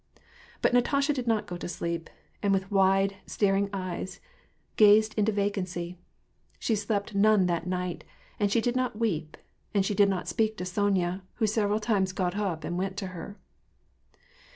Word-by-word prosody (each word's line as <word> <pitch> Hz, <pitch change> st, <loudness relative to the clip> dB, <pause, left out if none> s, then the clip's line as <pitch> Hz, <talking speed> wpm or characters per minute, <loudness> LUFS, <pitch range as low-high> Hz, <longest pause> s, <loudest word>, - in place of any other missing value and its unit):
But -, -, +3 dB
Natasha 280 Hz, +4 st, +3 dB
did 255 Hz, -3 st, -4 dB
not 225 Hz, -2 st, +1 dB
go 175 Hz, -, -6 dB
to -, -, -6 dB
sleep, 170 Hz, -1 st, -4 dB, 0.3 s
and 200 Hz, -, +2 dB
with 195 Hz, 0 st, 0 dB
wide, 195 Hz, 0 st, +3 dB
staring 200 Hz, -1 st, +1 dB
eyes 185 Hz, -1 st, -4 dB, 0.6 s
gazed 215 Hz, +1 st, +6 dB
into 215 Hz, 0 st, +2 dB
vacancy. 180 Hz, -4 st, -2 dB, 0.6 s
She 230 Hz, -, 0 dB
slept 205 Hz, 0 st, -2 dB
none 205 Hz, -1 st, +4 dB
that 170 Hz, -1 st, -1 dB
night, 180 Hz, -1 st, -3 dB, 0.4 s
and 205 Hz, -1 st, +2 dB
she 230 Hz, -, +3 dB
did 245 Hz, +2 st, 0 dB
not 255 Hz, -4 st, -1 dB
weep, 165 Hz, -9 st, -2 dB, 0.4 s
and 195 Hz, -1 st, +3 dB
she 205 Hz, -, 0 dB
did 200 Hz, 0 st, +4 dB
not 185 Hz, -2 st, -2 dB
speak 220 Hz, -1 st, 0 dB
to -, -, -4 dB
Sony 190 Hz, 0 st, +1 dB
a, 185 Hz, +2 st, -4 dB
who 225 Hz, -, +1 dB
several 210 Hz, 0 st, +1 dB
times 200 Hz, -4 st, +1 dB
got 185 Hz, -1 st, -1 dB
up 190 Hz, -7 st, -2 dB
and 175 Hz, +3 st, -3 dB
went 190 Hz, +1 st, -3 dB
to 200 Hz, -2 st, -3 dB
her. 180 Hz, +4 st, -8 dB
200 Hz, 175 wpm, -28 LUFS, 185-215 Hz, 0.6 s, gazed